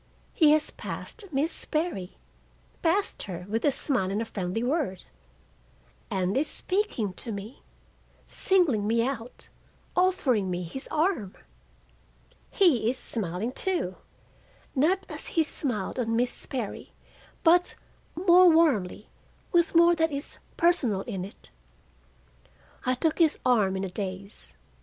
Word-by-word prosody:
He 310 -3 +5
has 310 0 +1
passed 440 - -5
Miss 295 +4 +1
Sperry—passed 330 - -3
her 180 -2 -5
with 225 +2 -2
a - - +5
smile 255 -8 -1
and 200 +2 -1
a 230 - -1
friendly 195 +1 -3
word—and 180 - -5
is 290 +3 +1
speaking 365 - -1
to 230 +5 -6
me, 210 +5 -7 0.6
singling 305 - +2
me 230 +1 +2
out, 250 -3 -5 0.5
offering 285 - +2
me 180 0 -2
his 220 +11 -6
arm! 305 - 0 1.1
He 285 - +3
is 255 - 0
smiling, 205 +1 -2
too, 340 - -1 0.8
not 360 +8 +2
as - - -5
he 325 - +6
smiled 250 -8 -2
on 230 -2 0
Miss 245 +1 +2
Sperry, 240 -6 -6 0.5
but 350 +1 +4 0.4
more 360 +1 +6
warmly, 275 - +2 0.4
with 340 -1 +2
more 340 +1 +7
that 325 -1 +2
is 280 +1 -6 0.2
personal 265 - +2
in 190 -2 -5
it. 195 - -12 1.4
I 255 - +3
took 315 +6 0
his 325 -3 +4
arm 210 -7 +3
in 190 - -3
a 195 - -3
daze. 195 +1 -7
250 Hz, 125 wpm, -27 LUFS, 195-330 Hz, 1.4 s, more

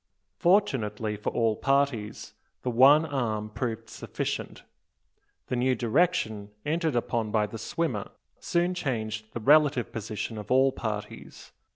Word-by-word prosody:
Fortunately 115 - +1
for 105 - -3
all 115 -2 +1
parties, 135 -5 0 0.3
the 125 - -1
one 140 +6 +6
arm 110 -7 -2
proved 115 -1 -4
sufficient. - - -5 0.8
The - - -3
new 125 +1 +2
direction 115 - 0 0.2
entered 160 -2 0
upon 115 -2 -1
by 105 0 +2
the 110 +2 -8
swimmer 115 -2 -2 0.3
soon 175 +1 0
changed 110 -9 -3
the - - -3
relative 145 0 +4
position 110 0 -5
of 105 - -9
all 130 +1 +4
parties. 105 -4 -6
120 Hz, 130 wpm, -27 LUFS, 110-140 Hz, 0.8 s, one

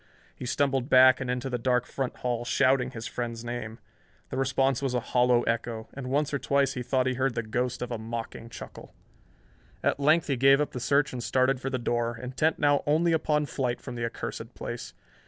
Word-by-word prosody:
He 125 - -7
stumbled 135 -1 0
back 130 -1 +7
and 130 - -3
into 125 +1 -2
the 125 -2 -2
dark 125 0 +1
front 135 -2 -4
hall, 120 -1 -2
shouting 130 +1 +2
his 115 -3 -7
friend's 120 -1 -4
name. 120 -2 -5 0.5
The - - -3
response 135 0 +1
was 135 -2 -1
a - - +2
hollow 125 -1 +4
echo, 115 -1 -2
and 130 -2 -6
once 145 +2 0
or 140 - 0
twice 140 +2 +1
he 125 - -4
thought 130 +1 +1
he 130 - +1
heard 130 -1 0
the 115 - -1
ghost 125 +3 -2
of 125 - -6
a 115 - -3
mocking 115 0 -6
chuckle. - - -10 0.9
At - - +1
length 155 +3 +4
he 140 -3 -1
gave 135 +2 +6
up 150 -1 0
the 125 - -5
search 140 +3 +2
and 125 -1 -4
started 130 +2 +2
for 135 - -2
the 130 - -1
door, 120 -1 -1
intent 130 +6 0
now 145 -1 +3
only 165 +3 +3
upon 150 -2 +1
flight 125 -4 -2
from - - -8
the 120 -1 -4
accursed 115 - -6
place. - - -6
130 Hz, 210 wpm, -28 LUFS, 120-135 Hz, 0.9 s, back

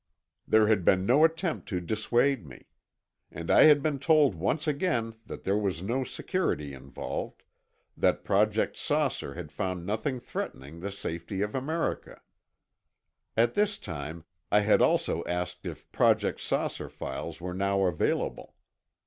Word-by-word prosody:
There 110 0 +5
had 105 -4 +3
been 95 +2 +3
no 130 +8 +5
attempt 165 +1 +1
to 90 -5 -1
dissuade 115 +6 +1
me. 70 -4 -13 0.6
And 85 +1 -4
I - - +8
had 150 -2 +6
been 150 -3 0
told 150 - +4
once 100 - -1
again 140 -7 0
that - - -8
there 100 +2 +1
was 95 -5 -2
no 120 +7 0
security 125 - -2
involved; 70 0 -6 0.5
that - - +1
Project - - +2
"Saucer" 70 - -1
had 85 -3 -7
found 90 -1 -3
nothing 115 +7 -2
threatening 75 - -6
the 100 +4 -4
safety 95 +1 -4
of 105 - -3
America. 155 +6 -2 1.2
At 120 +1 +4
this 205 0 +1
time 80 0 -6 0.3
I 105 - +5
had 105 +1 +4
also - - +2
asked 90 +1 -3
if - - -9
Project - - +2
"Saucer" - - -2
files - - -6
were 90 +1 -5
now 100 +1 +1
available. 90 -4 -1
105 Hz, 145 wpm, -28 LUFS, 90-135 Hz, 1.2 s, I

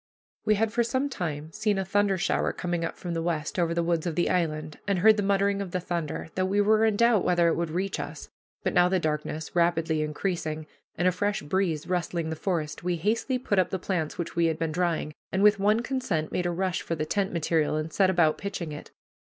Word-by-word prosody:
We 215 - +4
had 220 +1 0
for 240 - +2
some 260 +4 0
time 160 - -4
seen 215 +1 0
a 195 - -1
thunder 200 0 +2
shower - - +1
coming 175 -1 -2
up 165 - -4
from 175 -2 -5
the 165 - -1
west 165 0 -2
over 170 -1 +2
the 170 0 0
woods 170 0 0
of 165 - -2
the 175 - +1
island, 155 -4 -1
and 200 -2 +2
heard 215 +4 +6
the 210 - 0
muttering 200 0 +1
of 195 - -4
the 185 - -2
thunder, 170 -3 -3
though 185 - 0
we 195 +2 +1
were 215 +2 +4
in 220 -2 +2
doubt 235 -2 +4
whether 175 -1 +3
it - - +1
would 170 -1 -1
reach 185 +2 -2
us; 145 +1 -6 0.4
but - - 0
now 175 0 +5
the 190 0 +2
darkness 155 0 -3
rapidly 165 -2 +2
increasing, 155 0 -2 0.3
and 175 - +2
a - - +5
fresh 205 +1 -1
breeze 160 -1 0
rustling 170 -2 -2
the - - -2
forest, 160 -3 -2
we 180 0 0
hastily 220 - 0
put 205 -6 0
up 185 - +2
the 190 - -1
plants 175 -4 -2
which 170 - -4
we 170 -1 +3
had 160 -1 0
been 160 -1 -1
drying, 165 -2 -1 0.2
and 190 +1 +1
with 210 -1 +6
one 210 +3 +3
consent 240 - -2
made 180 -1 0
a - - 0
rush 185 +1 -1
for 165 - -3
the 155 -1 -2
tent 195 +3 0
material 160 -2 +1
and 155 +1 -3
set 190 -2 +4
about 170 -4 +3
pitching 185 -5 -4
it. 150 - -8
175 Hz, 240 wpm, -27 LUFS, 160-200 Hz, 0.4 s, heard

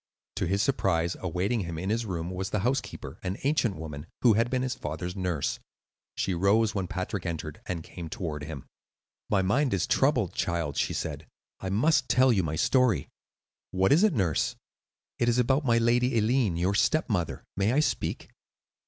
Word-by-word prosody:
To - - 0
his 100 +3 +1
surprise, 85 -10 +1
awaiting 95 +6 -1
him 85 -4 -4
in 95 +5 -2
his 115 0 -1
room 85 -2 -3
was 95 +1 -3
the 105 - -1
housekeeper, 125 +6 -2
an 95 +3 -3
ancient 135 -7 +1
woman, 75 -2 -7 0.2
who 120 -3 +7
had 115 +3 +2
been 130 0 0
his 130 -1 -1
father's 85 +4 -5
nurse. 90 -6 -1 0.6
She 95 - -1
rose 100 +5 +3
when 95 -3 -2
Patrick 95 +1 -3
entered, 80 -3 -5
and 85 -3 -3
came 85 -1 -8
toward 80 -4 -4
him. 75 -4 -7 0.6
"My 95 -2 +2
mind 125 +5 +2
is 90 - 0
troubled, - - +2
child," 85 -4 -1
she - - 0
said; - - -4 0.3
"I 95 - -4
must 125 +6 +2
tell 130 -1 +5
you 100 - +2
my 80 -2 -2
story." 125 - +2 0.6
"What 95 +1 +2
is 160 +8 +5
it, 210 -8 +4
nurse?" 90 - +1 0.6
"It 120 - +3
is 120 - +2
about 130 +4 +2
my 115 -2 +4
lady 120 +1 +2
Eileen, 110 -4 +2
your 90 +3 +1
stepmother. 105 - +1
May 100 +3 +2
I 135 - +3
speak?" 155 - -1
100 Hz, 180 wpm, -28 LUFS, 85-120 Hz, 0.6 s, who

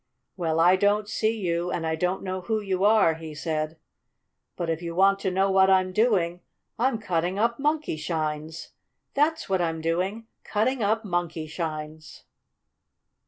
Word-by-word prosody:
"Well, 165 -3 -1
I 180 +3 +6
don't 205 +2 +2
see 220 +1 0
you, 175 -3 -1
and 165 -2 -2
I 160 0 0
don't 180 +3 -1
know 185 -1 -3
who 220 +3 -1
you 195 -2 -2
are," 210 -5 +5
he 160 -1 -8
said, 155 0 -3 0.8
"but 175 - -3
if 165 0 -2
you 170 -1 -5
want 195 +2 +4
to 190 - -1
know 190 +1 +1
what 190 0 +5
I'm 185 -1 +3
doing, 185 -6 +2 0.4
I'm 250 0 +2
cutting 180 -3 -1
up 235 +3 +1
Monkeyshines! 160 - -2 0.4
That's 315 +3 +1
what 190 -2 +1
I'm 165 -1 -1
doing! 180 +7 -1 0.2
Cutting 235 +4 0
up 220 +2 +1
Monkeyshines!" 160 -3 -4
185 Hz, 155 wpm, -26 LUFS, 165-210 Hz, 0.8 s, I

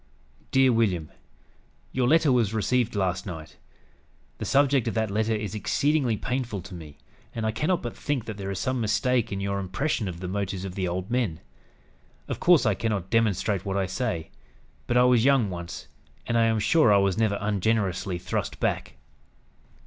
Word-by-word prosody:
"DEAR 130 -1 +4
WILLIAM: 95 -9 0 0.8
"Your 125 -2 +1
letter 160 0 +4
was 115 -4 +2
received 120 +1 +1
last 95 -1 -1
night. 80 -4 -8 0.8
The - - -3
subject 140 -3 +3
of 115 - -2
that 110 -2 0
letter 110 +2 +1
is 105 -2 -4
exceedingly 130 +3 +1
painful 125 -3 -3
to 95 - -10
me; 80 -4 -10 0.4
and 115 -1 -2
I 110 - +1
cannot 155 +11 0
but 120 - -5
think 140 -6 -2
that 110 - -5
there 100 -1 -5
is 100 - -3
some 130 +3 -1
mistake 115 +2 +1
in 100 - -2
your 100 0 -2
impression 105 +4 -1
of 85 -2 -6
the 90 - -5
motives 95 0 -3
of 95 - -6
the 95 -1 -2
old 90 +4 -4
men. 115 -11 0 0.9
Of - - -4
course 175 -6 +5
I 110 - +3
cannot 100 -3 -2
demonstrate 105 -3 +1
what 100 0 -2
I 95 - +1
say; 90 -5 -3 0.6
but 120 - +2
I 125 - +6
was 125 -2 +4
young 130 -7 +3
once, 85 -1 -7 0.4
and 115 - -1
I 115 -1 +4
am 110 -1 +2
sure 120 +2 +4
I 100 - +6
was 100 0 +1
never 105 -3 +2
ungenerously 100 -2 0
thrust 90 - -3
back. - - -1
110 Hz, 185 wpm, -26 LUFS, 95-125 Hz, 0.9 s, I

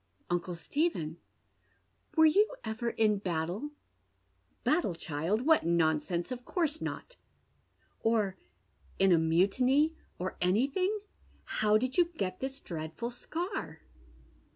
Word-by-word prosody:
" - - -38
Uncle 175 0 -1
Stephen, 170 - -1 1.0
were 320 - +8
you 415 +10 +4
ever 220 +2 -2
in 215 -3 +2
battle? 180 - -2 0.3
" - - -43
" - - -41
Battle, 305 - +2
child? 165 - -1
What 320 0 +5
nonsense! 170 - +1
Of 250 -1 -5
course 315 0 -1
not." - - -5 0.4
" - - -40
Or 215 -4 +2 0.6
in 195 0 +4
a^mutiny 200 - +3
— - - -38
or 185 +1 -4
anything? 280 - +1 0.4
How 215 0 +2
did 255 +8 -1
you 350 - +7
get 185 -1 -2
this 265 0 -4
dread 160 -2 -6
ful 235 +1 -3
scar 325 - -5
215 Hz, 130 wpm, -31 LUFS, -, 1.0 s, were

